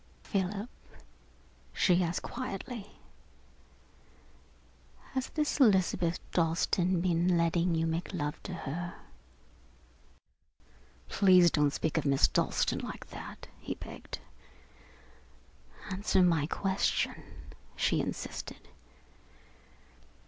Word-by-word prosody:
"Philip," 200 +2 -2 1.1
she 180 -1 +3
asked 170 +1 -2
quietly, 235 -2 -5 2.2
"has 260 -1 -2
this 300 -1 -1
Elizabeth 185 -7 +4
Dalstan 170 +1 +2
been 175 0 +2
letting 170 +1 +2
you 165 0 +1
make 165 +2 -2
love 150 -4 -3
to 190 - -7
her?" 170 +3 -5 2.1
"Please 185 -4 +6
don't 150 -1 +3
speak 160 +3 0
of 150 - -4
Miss 135 -1 +5
Dalstan - - +1
like - - -7
that," - - -8
he - - -4
begged. - - -8 1.7
"Answer 190 -1 +2
my 165 -5 +3
question," 195 +3 0 0.5
she - - +2
insisted. - - -6
180 Hz, 90 wpm, -31 LUFS, 165-195 Hz, 2.2 s, Please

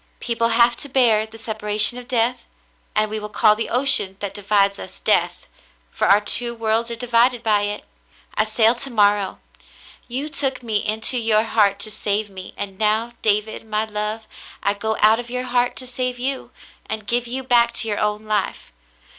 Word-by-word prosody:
"People 230 -1 -1
have 235 +1 +4
to 285 - -3
bear 230 -5 +3
the 220 +1 -13
separation 215 +1 +1
of 245 - -12
death, 245 0 0 0.5
and 215 0 +2
we 215 +1 -4
will 210 0 -7
call 210 0 +4
the 225 - -4
ocean 245 -7 +3
that 200 -2 -5
divides 200 0 +1
us - - -9
Death, - - 0 0.5
for - - -1
our 200 - +6
two 235 +3 +2
worlds 225 +1 0
are 235 - -4
divided 240 0 +2
by 210 -2 +2
it. 210 - -6 0.5
I 215 - +1
sail 220 +1 +3
to 250 +3 -3
morrow. 205 -4 +2 0.7
You 260 +5 -4
took 270 -4 -2
me 220 -3 0
into 220 +4 0
your 220 -2 +2
heart 210 -3 +2
to 215 - -3
save 210 0 -2
me, 190 -1 -10
and 195 -2 -6
now, 220 +2 +1
David 215 +1 0
my 215 0 -1
love, 210 +1 -4 0.4
I 200 - +2
go 220 +2 -3
out 220 +2 +5
of 240 0 -7
your 250 +1 -3
heart 245 -1 0
to 255 - -6
save 250 0 -3
you, 265 +2 -3 0.4
and 220 -1 -4
give 240 +3 0
you 260 +2 -4
back 240 -2 +4
to 225 - -3
your 205 -2 -2
own 210 0 -1
life. 210 -2 -2
220 Hz, 190 wpm, -21 LUFS, 210-240 Hz, 0.7 s, our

